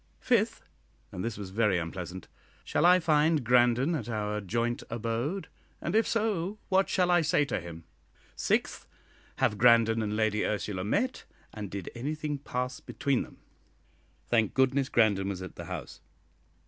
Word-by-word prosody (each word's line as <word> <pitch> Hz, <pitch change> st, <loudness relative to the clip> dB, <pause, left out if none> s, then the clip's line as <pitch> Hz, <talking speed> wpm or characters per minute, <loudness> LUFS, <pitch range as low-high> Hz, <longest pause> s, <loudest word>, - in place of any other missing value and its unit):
Fifth 230 Hz, -2 st, +1 dB, 0.5 s
and 90 Hz, -, -5 dB
this 115 Hz, -1 st, -3 dB
was 100 Hz, -3 st, -7 dB
very 105 Hz, -2 st, +2 dB
unpleasant 90 Hz, +1 st, -5 dB, 0.4 s
Shall 170 Hz, -, +2 dB
I 180 Hz, +1 st, +7 dB
find 155 Hz, -2 st, +3 dB
Grandon 125 Hz, +5 st, +4 dB
at 125 Hz, -8 st, -3 dB
our 105 Hz, -1 st, -2 dB
joint 115 Hz, +5 st, -1 dB
abode? 120 Hz, -, -2 dB, 0.3 s
And 170 Hz, -, -3 dB
if 225 Hz, -, +3 dB
so, 210 Hz, -3 st, -1 dB
what 190 Hz, 0 st, +3 dB
shall 180 Hz, -1 st, +2 dB
I 175 Hz, -1 st, +5 dB
say 150 Hz, -1 st, +2 dB
to 115 Hz, -, -2 dB
him? 85 Hz, -1 st, -9 dB, 0.5 s
Sixth, -, -, -1 dB, 0.5 s
Have 105 Hz, -, 0 dB
Grandon 115 Hz, -2 st, +5 dB
and 105 Hz, -1 st, -2 dB
Lady 110 Hz, -1 st, +1 dB
Ursula 105 Hz, -3 st, -2 dB
met, 235 Hz, -, -1 dB, 0.3 s
and 105 Hz, -2 st, -6 dB
did 95 Hz, -2 st, -6 dB
anything 150 Hz, +3 st, -3 dB
pass 125 Hz, -2 st, -3 dB
between 140 Hz, -3 st, -1 dB
them? -, -, -10 dB, 0.9 s
Thank 110 Hz, -3 st, +1 dB
goodness 130 Hz, 0 st, +2 dB
Grandon 100 Hz, -4 st, +2 dB
was 95 Hz, -2 st, -4 dB
at 95 Hz, -, -9 dB
the -, -, -8 dB
House. -, -, -7 dB
120 Hz, 155 wpm, -29 LUFS, 105-155 Hz, 0.9 s, I